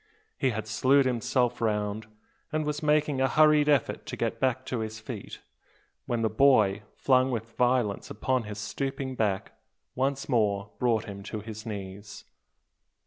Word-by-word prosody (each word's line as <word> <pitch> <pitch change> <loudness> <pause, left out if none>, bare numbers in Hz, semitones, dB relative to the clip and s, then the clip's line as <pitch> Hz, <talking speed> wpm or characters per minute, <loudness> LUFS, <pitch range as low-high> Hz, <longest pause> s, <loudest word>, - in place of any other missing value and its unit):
He 135 - +1
had 110 -2 -3
slewed 130 +6 +3
himself 125 0 0
round, 105 -1 -1 0.4
and 155 -1 -1
was 150 0 -2
making 150 -2 +2
a 130 - +4
hurried 150 0 +5
effort 145 -5 +1
to - - -5
get 130 0 0
to 125 -2 -3
his 110 0 -4
feet, 110 -2 -8 0.7
when 120 -1 -1
the - - +3
boy, 110 -4 +4
flung 130 -1 +3
with 115 -2 -4
violence 125 -4 +1
upon 125 +3 -1
his 105 0 -6
stooping 135 +5 -3
back, 105 -6 -1 0.4
once 135 +1 -1
more 105 -5 +1
brought 115 -3 +1
him 100 -2 -8
to 110 -1 -5
his 110 +1 -8
knees. 100 0 -7
120 Hz, 150 wpm, -28 LUFS, 105-135 Hz, 0.7 s, hurried